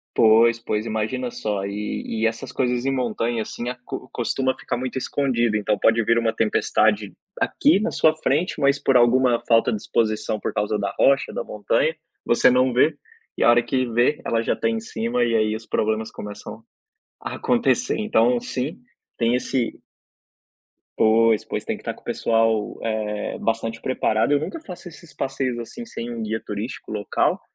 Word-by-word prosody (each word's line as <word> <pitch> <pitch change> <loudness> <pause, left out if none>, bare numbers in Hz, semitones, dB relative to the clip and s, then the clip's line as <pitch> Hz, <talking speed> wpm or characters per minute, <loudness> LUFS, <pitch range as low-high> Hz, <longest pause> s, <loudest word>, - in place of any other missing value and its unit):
Pois, 115 +1 +5
pois, 110 -1 -2
imagina 110 +3 -2
só, 105 -4 -3
e 105 +1 -4 0.2
e - - +4
essas 125 +3 -6
coisas 125 -1 0
em 135 - +1
montanha 120 -2 -1
assim 120 +2 -6
a 125 - -2
co 130 - -7
costuma 130 +2 0
ficar 125 - -3
muito 130 +1 -4
escondido. 120 -4 0
Então 105 0 0
pode 115 +2 +3
vir 115 - +3
uma 115 -1 +1
tempestade 105 -2 +1 0.3
aqui 285 -8 +3
na 225 - 0
sua 160 0 +3
frente, 155 +2 -1
mas 140 0 +3
por 135 -2 +3
alguma 120 0 +4
falta 115 -1 +4
de 110 - -1
exposição 110 -1 0
por - - -3
causa 105 +1 -1
da 100 -1 -3
rocha, 140 0 +3
da - - -3
montanha, - - 0 0.3
você - - +4
não 125 0 +3
vê 145 +5 +3 0.4
e - - -2
a - - +6
hora 120 0 +5
que 130 0 0
vê, 120 +6 +2
ela 115 - +1
já - - 0
está 115 - 0
em 115 - 0
cima, 115 +2 -1
e 115 - 0
aí 110 -1 +2
os 110 - -11
problemas 110 +1 -1
começam 105 +2 -8 0.6
a - - -5
acontecer. 245 0 +1
Então 125 - +2
sim, 130 +6 -4 0.4
tem 115 +1 +2
esse 125 -1 -1 1.2
Pois, 110 0 +4
pois, - - -4
tem - - -2
que - - -14
estar - - -4
com - - -18
o - - -36
pessoal, 115 -2 +1
é, 110 -2 -2
bastante 115 0 -2
preparado. 110 -2 +1
Eu 145 - +4
nunca 240 - -5
faço 180 - -9
esses 165 -2 -15
passeios, 135 -2 -2
assim, 120 - -7
sem 120 - -7
um 115 -1 -5
guia 110 +1 -2
turístico 105 +4 -6
local, 105 -1 0
115 Hz, 185 wpm, -23 LUFS, 110-130 Hz, 1.2 s, a